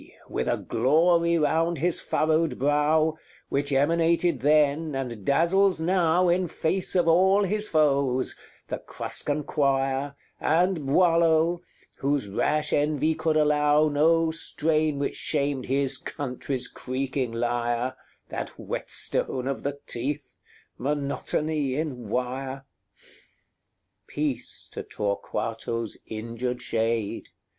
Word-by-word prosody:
with -, -, -2 dB
a -, -, +1 dB
glory 170 Hz, +7 st, +3 dB
round 165 Hz, +2 st, +1 dB
his 170 Hz, +3 st, 0 dB
furrowed 155 Hz, -3 st, +1 dB
brow, 150 Hz, +3 st, +2 dB, 0.3 s
Which 140 Hz, +1 st, -1 dB
emanated 165 Hz, +2 st, +2 dB
then, 150 Hz, +2 st, +2 dB
and 120 Hz, -6 st, -4 dB
dazzles 175 Hz, -, +3 dB
now 175 Hz, +1 st, +2 dB
In 180 Hz, +1 st, +2 dB
face 175 Hz, +4 st, -2 dB
of 175 Hz, -2 st, +3 dB
all 190 Hz, +4 st, +5 dB
his 210 Hz, +2 st, 0 dB
foes, 140 Hz, -4 st, +2 dB, 0.3 s
the -, -, -4 dB
Cruscan 150 Hz, 0 st, -3 dB
quire, 135 Hz, -1 st, 0 dB, 0.2 s
And 170 Hz, -2 st, +1 dB
Boileau, 165 Hz, +1 st, +3 dB, 0.4 s
whose 140 Hz, -5 st, 0 dB
rash 150 Hz, +9 st, 0 dB
envy 150 Hz, +1 st, +2 dB
could 160 Hz, 0 st, 0 dB
allow 150 Hz, 0 st, +3 dB
No 160 Hz, +2 st, +3 dB
strain 155 Hz, -2 st, 0 dB
which 140 Hz, -, -2 dB
shamed 140 Hz, -3 st, -1 dB
his 135 Hz, 0 st, +1 dB
country's 130 Hz, -1 st, -4 dB
creaking 130 Hz, -1 st, -3 dB
lyre, 120 Hz, +1 st, -1 dB, 0.3 s
That -, -, -4 dB
whetstone 130 Hz, 0 st, -2 dB
of 135 Hz, -, -2 dB
the 140 Hz, 0 st, -4 dB
teeth 135 Hz, +1 st, -4 dB, 0.4 s
monotony 145 Hz, +1 st, -1 dB
in 130 Hz, -7 st, -4 dB
wire! 130 Hz, +3 st, -3 dB, 0.3 s
XXXIX. -, -, -31 dB
Peace 140 Hz, -5 st, -4 dB
to -, -, -5 dB
Torquato's 110 Hz, +2 st, -3 dB
injured 115 Hz, +3 st, -4 dB
shade! 115 Hz, -2 st, -1 dB
145 Hz, 110 wpm, -26 LUFS, 130-160 Hz, 0.4 s, all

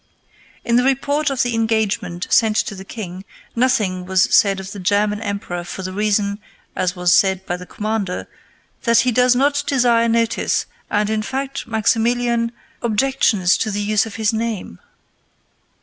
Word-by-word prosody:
In 235 Hz, 0 st, +3 dB
the 250 Hz, -, +3 dB
report 285 Hz, +3 st, +1 dB
of 270 Hz, -2 st, 0 dB
the 245 Hz, -1 st, -2 dB
engagement 220 Hz, -5 st, -1 dB
sent 220 Hz, -2 st, +4 dB
to -, -, 0 dB
the 190 Hz, -1 st, -9 dB
king, 190 Hz, -3 st, -7 dB, 0.3 s
nothing 220 Hz, -7 st, +1 dB
was 185 Hz, 0 st, +2 dB
said 195 Hz, -2 st, +4 dB
of 190 Hz, +1 st, -7 dB
the 200 Hz, -, -7 dB
German 205 Hz, +3 st, +1 dB
emperor 200 Hz, -4 st, -4 dB
for 190 Hz, +2 st, -7 dB
the 185 Hz, 0 st, -5 dB
reason, 205 Hz, 0 st, 0 dB, 0.4 s
as 180 Hz, 0 st, -1 dB
was 180 Hz, -1 st, +2 dB
said 190 Hz, -1 st, +3 dB
by 175 Hz, -, -2 dB
the 180 Hz, 0 st, -10 dB
commander, 210 Hz, -4 st, -3 dB, 0.5 s
"that 235 Hz, -1 st, +4 dB
he 250 Hz, +1 st, +1 dB
does 250 Hz, +1 st, +4 dB
not 285 Hz, +2 st, +2 dB
desire 240 Hz, -4 st, +3 dB
notice, 230 Hz, 0 st, +1 dB, 0.2 s
and, 210 Hz, 0 st, 0 dB
in 215 Hz, 0 st, 0 dB
fact, 270 Hz, +4 st, -4 dB
Maximilian 230 Hz, +1 st, +1 dB, 0.3 s
objections 220 Hz, -5 st, +2 dB
to 220 Hz, -, -1 dB
the 205 Hz, 0 st, -2 dB
use 215 Hz, +1 st, +1 dB
of 210 Hz, -, -9 dB
his 220 Hz, 0 st, 0 dB
name." 220 Hz, -, -3 dB
215 Hz, 165 wpm, -20 LUFS, 195-235 Hz, 0.5 s, sent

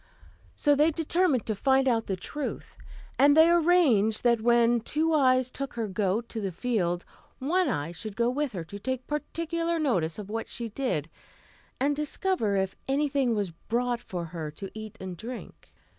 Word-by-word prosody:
So 290 Hz, -, +3 dB
they 300 Hz, +3 st, +4 dB
determined 325 Hz, -, +1 dB
to 220 Hz, -, -1 dB
find 265 Hz, +5 st, +2 dB
out 230 Hz, -3 st, +1 dB
the 190 Hz, -, -1 dB
truth, 285 Hz, +11 st, -6 dB, 0.4 s
and 285 Hz, +2 st, +6 dB
they 325 Hz, +2 st, +7 dB
arranged 310 Hz, -, +4 dB
that 235 Hz, -2 st, +3 dB
when 235 Hz, 0 st, +4 dB
Two 315 Hz, +8 st, 0 dB
Eyes 255 Hz, -3 st, +3 dB
took 275 Hz, -2 st, -5 dB
her 230 Hz, -2 st, -2 dB
goat 200 Hz, +3 st, -1 dB
to 225 Hz, -, -4 dB
the 195 Hz, -2 st, -2 dB
field, 180 Hz, -4 st, -1 dB, 0.3 s
One 350 Hz, +7 st, +1 dB
Eye 145 Hz, +3 st, -2 dB
should 195 Hz, +4 st, -7 dB
go 235 Hz, 0 st, +2 dB
with 285 Hz, -1 st, -2 dB
her 175 Hz, -4 st, -4 dB
to 200 Hz, +5 st, -9 dB
take 260 Hz, +3 st, -3 dB
particular 335 Hz, +3 st, -2 dB
notice 185 Hz, -, 0 dB
of 210 Hz, -2 st, -7 dB
what 225 Hz, +1 st, -3 dB
she 235 Hz, -1 st, -4 dB
did, 210 Hz, -, -2 dB, 0.7 s
and 285 Hz, +2 st, +2 dB
discover 300 Hz, -, 0 dB
if 190 Hz, -1 st, 0 dB
anything 275 Hz, -3 st, +1 dB
was 200 Hz, -4 st, -1 dB
brought 240 Hz, +7 st, -2 dB
for 175 Hz, -6 st, -5 dB
her 160 Hz, -2 st, -5 dB
to 190 Hz, +6 st, -8 dB
eat 215 Hz, -1 st, -8 dB
and 185 Hz, -1 st, -6 dB
drink. 235 Hz, +7 st, -9 dB
240 Hz, 175 wpm, -28 LUFS, 200-290 Hz, 0.7 s, they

